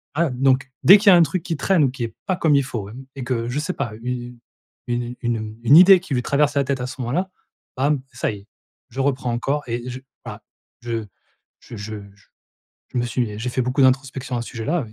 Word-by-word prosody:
voilà. 165 Hz, -1 st, +2 dB
Donc 130 Hz, +1 st, +1 dB
dès 195 Hz, +4 st, +10 dB
qu'il 205 Hz, +1 st, -4 dB
y -, -, +8 dB
a -, -, +8 dB
un 170 Hz, -, +7 dB
truc 165 Hz, +4 st, -2 dB
qui 165 Hz, -, -3 dB
traîne 185 Hz, 0 st, +2 dB
ou 130 Hz, -, +1 dB
qui 125 Hz, -2 st, -5 dB
est 115 Hz, -, -8 dB
pas 185 Hz, -, +1 dB
comme 160 Hz, -5 st, +3 dB
il 140 Hz, -, +3 dB
faut 110 Hz, -6 st, -5 dB
et -, -, -11 dB, 0.2 s
et 135 Hz, -, -6 dB
que, 120 Hz, -2 st, -2 dB
je 135 Hz, +4 st, -2 dB
sais 155 Hz, +4 st, -2 dB
pas, 120 Hz, -6 st, -4 dB
une 125 Hz, -1 st, -5 dB, 0.5 s
une 120 Hz, 0 st, -3 dB
une, 120 Hz, -1 st, 0 dB
heu, 110 Hz, 0 st, -6 dB
une 140 Hz, +6 st, +7 dB
idée 185 Hz, +1 st, +9 dB
qui 165 Hz, -, -6 dB
lui 125 Hz, -, -1 dB
traverse 145 Hz, +1 st, +1 dB
la 140 Hz, -, +3 dB
tête 135 Hz, -2 st, -2 dB
à 125 Hz, -, -3 dB
ce 135 Hz, -, -9 dB
moment-là, 170 Hz, +11 st, -1 dB, 0.5 s
bam, 140 Hz, +1 st, +1 dB
ça 120 Hz, -, -1 dB
y 105 Hz, -, -8 dB
est, 100 Hz, -, -20 dB, 0.4 s
je 130 Hz, +2 st, -8 dB
reprends 130 Hz, -3 st, 0 dB
encore 140 Hz, +5 st, -1 dB
et 120 Hz, +1 st, -4 dB
je 125 Hz, +1 st, -6 dB, 0.3 s
voilà. -, -, -8 dB, 0.4 s
Je 115 Hz, -2 st, -3 dB, 0.5 s
je -, -, -11 dB
je 105 Hz, +1 st, -6 dB, 0.2 s
je 100 Hz, -, -26 dB, 0.6 s
je -, -, -9 dB
me 120 Hz, -, 0 dB
suis 115 Hz, -4 st, -2 dB
j'ai 120 Hz, +3 st, -3 dB
fait 130 Hz, -, -1 dB
beaucoup 125 Hz, +3 st, +1 dB
d'introspection 130 Hz, -1 st, +1 dB
à 120 Hz, -, -3 dB
ce -, -, -9 dB
sujet-là, 135 Hz, +6 st, -2 dB
mais 110 Hz, -, -15 dB
130 Hz, 250 wpm, -22 LUFS, 120-145 Hz, 0.6 s, dès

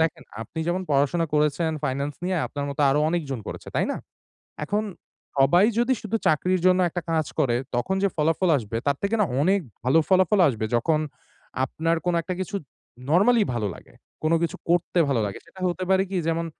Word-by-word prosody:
দেখেন 160 Hz, 0 st, 0 dB, 0.2 s
আপনি 140 Hz, -, -9 dB
যেমন 185 Hz, +2 st, 0 dB
পড়াশোনা 145 Hz, +4 st, +2 dB
করেছেন 150 Hz, +2 st, +1 dB
ফাইনান্স 140 Hz, +2 st, -2 dB
নিয়ে, 185 Hz, 0 st, 0 dB
আপনার 145 Hz, -1 st, -5 dB
মতো 140 Hz, -, -5 dB
আরো 145 Hz, -, +2 dB
অনেকজন 150 Hz, -6 st, -2 dB
করেছে, -, -, -7 dB
তাই -, -, +2 dB
না? -, -, -4 dB, 0.7 s
এখন 205 Hz, +6 st, -1 dB, 0.5 s
সবাই 175 Hz, +9 st, +5 dB
যদি 240 Hz, +2 st, +3 dB
শুধু 215 Hz, +1 st, -1 dB
চাকরির 180 Hz, +4 st, +2 dB
জন্য 185 Hz, 0 st, +5 dB
একটা 175 Hz, 0 st, -4 dB
কাজ 160 Hz, -2 st, +1 dB
করে, 120 Hz, -3 st, +2 dB, 0.2 s
তখন 190 Hz, +11 st, 0 dB
যে 200 Hz, -, +4 dB
ফলাফল 165 Hz, +4 st, +1 dB
আসবে 115 Hz, -3 st, -4 dB
তার 140 Hz, -1 st, +2 dB
থেকে 200 Hz, +3 st, 0 dB
না -, -, +5 dB, 0.2 s
অনেক 195 Hz, +4 st, +3 dB, 0.2 s
ভালো 135 Hz, +6 st, +4 dB
ফলাফল 185 Hz, +2 st, +4 dB
আসবে 110 Hz, -4 st, -2 dB
যখন 155 Hz, +6 st, +1 dB, 0.6 s
আপনার 165 Hz, +4 st, -1 dB
কোনো 175 Hz, -1 st, +2 dB
একটা 185 Hz, -, -4 dB
কিছু 200 Hz, +2 st, -3 dB, 0.5 s
নরমালি 215 Hz, +7 st, +5 dB
ভালো 110 Hz, -3 st, -1 dB
লাগে। -, -, -16 dB, 0.3 s
কোনো 160 Hz, +1 st, +3 dB
কিছু 165 Hz, -, -1 dB
করতে 175 Hz, 0 st, +1 dB
ভালো 125 Hz, -5 st, +1 dB
লাগে। 100 Hz, -, -6 dB
সেটা 190 Hz, -, -15 dB
হতে 185 Hz, +1 st, -3 dB
পারে 190 Hz, 0 st, +4 dB
কি 190 Hz, -, -2 dB
যেমন 165 Hz, 0 st, 0 dB
165 Hz, 190 wpm, -24 LUFS, 140-185 Hz, 0.7 s, সবাই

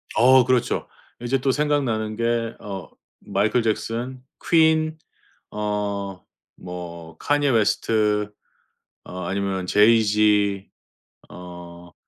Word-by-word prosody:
어 130 Hz, +2 st, +6 dB
그렇죠. 125 Hz, -2 st, 0 dB, 0.3 s
이제 125 Hz, +2 st, 0 dB
또 135 Hz, +1 st, +1 dB
생각나는 130 Hz, -7 st, 0 dB
게 115 Hz, 0 st, -1 dB
어 100 Hz, -3 st, -7 dB, 0.3 s
마이클 105 Hz, +4 st, 0 dB
잭슨, 120 Hz, +3 st, -3 dB, 0.3 s
퀸, 160 Hz, -1 st, +3 dB, 0.5 s
어 100 Hz, -2 st, -3 dB, 0.4 s
뭐 85 Hz, -2 st, -8 dB
칸예 145 Hz, -1 st, +1 dB
웨스트 105 Hz, -2 st, +1 dB, 0.7 s
어 90 Hz, -, -8 dB
아니면 95 Hz, 0 st, -2 dB
제이지 105 Hz, -1 st, +3 dB, 0.6 s
어 85 Hz, -1 st, -11 dB
105 Hz, 170 characters per minute, -23 LUFS, 100-125 Hz, 0.7 s, 어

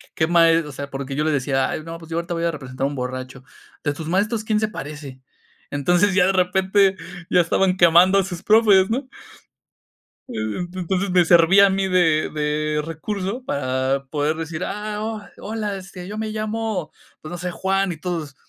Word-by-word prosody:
qué 160 Hz, -, +1 dB
maestro 165 Hz, -2 st, +4 dB
o -, -, -8 dB
sea, 140 Hz, +1 st, -7 dB
porque 135 Hz, 0 st, -5 dB
yo 150 Hz, -, 0 dB
les 155 Hz, 0 st, +1 dB
decía: 135 Hz, -1 st, 0 dB
"Ay, 155 Hz, -, -4 dB
no, 165 Hz, +1 st, -7 dB
pues 165 Hz, -1 st, -14 dB
yo 165 Hz, -, -3 dB
ahorita 170 Hz, +1 st, -3 dB
voy 170 Hz, 0 st, -1 dB
a 170 Hz, -, +1 dB
representar 135 Hz, -3 st, -5 dB
a -, -, +2 dB
un 145 Hz, -, -5 dB
borracho. 130 Hz, 0 st, -5 dB, 0.4 s
¿De 145 Hz, -, 0 dB
tus 155 Hz, +1 st, -7 dB
maestros 210 Hz, +5 st, 0 dB
quién 215 Hz, -1 st, +1 dB
se 215 Hz, -, +1 dB
parece?". 145 Hz, -7 st, -8 dB, 0.5 s
Entonces, 175 Hz, +7 st, +2 dB
ya 185 Hz, -2 st, +5 dB
de 190 Hz, -, +2 dB
repente 190 Hz, +1 st, +2 dB, 0.3 s
ya 180 Hz, -, +5 dB
estaban 185 Hz, +2 st, +1 dB
quemando 175 Hz, +2 st, +6 dB
a -, -, +2 dB
sus 180 Hz, -2 st, -7 dB
profes, 210 Hz, -3 st, +5 dB
¿no? 255 Hz, +4 st, -2 dB, 1.2 s
E -, -, -9 dB, 0.3 s
ento 180 Hz, +1 st, -5 dB
entonces, 190 Hz, +2 st, -1 dB
me 180 Hz, -1 st, +4 dB
servía 175 Hz, +4 st, +6 dB
a -, -, +1 dB
mí 195 Hz, 0 st, 0 dB
de 175 Hz, -4 st, +2 dB
de 150 Hz, 0 st, -1 dB
recurso 195 Hz, -, -4 dB
para 130 Hz, -, -1 dB
poder 150 Hz, +1 st, 0 dB
decir: 165 Hz, +1 st, -4 dB
"Ah, 210 Hz, 0 st, -4 dB
ho 220 Hz, -1 st, -4 dB, 0.2 s
hola, 210 Hz, -1 st, -4 dB
este, 185 Hz, -1 st, -10 dB
yo 210 Hz, +2 st, -6 dB
me 220 Hz, 0 st, -3 dB
llamo, 215 Hz, -4 st, -3 dB, 0.3 s
pues, 155 Hz, -, -9 dB
no 175 Hz, -, -5 dB
sé, 180 Hz, +1 st, -4 dB
Juan", 195 Hz, +1 st, 0 dB
y 170 Hz, -, -6 dB
todos, 160 Hz, -4 st, -4 dB
175 Hz, 200 wpm, -22 LUFS, 150-195 Hz, 1.2 s, quemando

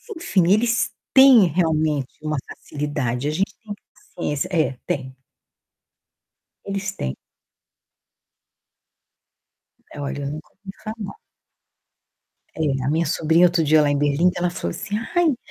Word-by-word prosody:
Enfim, 190 Hz, -, +1 dB
eles 230 Hz, +3 st, +2 dB, 0.2 s
têm 265 Hz, -6 st, +8 dB
realmente 155 Hz, -4 st, 0 dB
uma 155 Hz, 0 st, -2 dB
facilidade, 145 Hz, -3 st, -3 dB
a -, -, 0 dB
gente 195 Hz, +6 st, -1 dB
tem 210 Hz, -, -6 dB
que 205 Hz, -, -16 dB
ter -, -, -65 dB, 0.2 s
paciência 160 Hz, 0 st, -2 dB
É, 155 Hz, -7 st, +1 dB
tem. 130 Hz, -1 st, -3 dB, 1.5 s
Eles 195 Hz, 0 st, -3 dB
têm. 65 Hz, -, -4 dB, 2.8 s
É, -, -, -9 dB
olha, 145 Hz, 0 st, -4 dB
eu 140 Hz, -, -3 dB
nunca 155 Hz, +1 st, -8 dB
ouvi 195 Hz, -1 st, -11 dB
falar. 215 Hz, -2 st, -6 dB, 1.4 s
É, 140 Hz, -4 st, -1 dB
a 130 Hz, -, 0 dB
minha 160 Hz, +3 st, +1 dB
sobrinha 165 Hz, +2 st, +3 dB
outro 170 Hz, -1 st, +2 dB
dia 155 Hz, +1 st, +5 dB
lá 145 Hz, -, +2 dB
em 145 Hz, -, +1 dB
Berlim, 145 Hz, +5 st, +2 dB
ela 180 Hz, 0 st, 0 dB
falou 85 Hz, -, -4 dB
assim: 205 Hz, -, -4 dB, 0.2 s
"Ai, 350 Hz, -, +4 dB
o 265 Hz, -, -1 dB
160 Hz, 140 wpm, -22 LUFS, 145-195 Hz, 2.8 s, têm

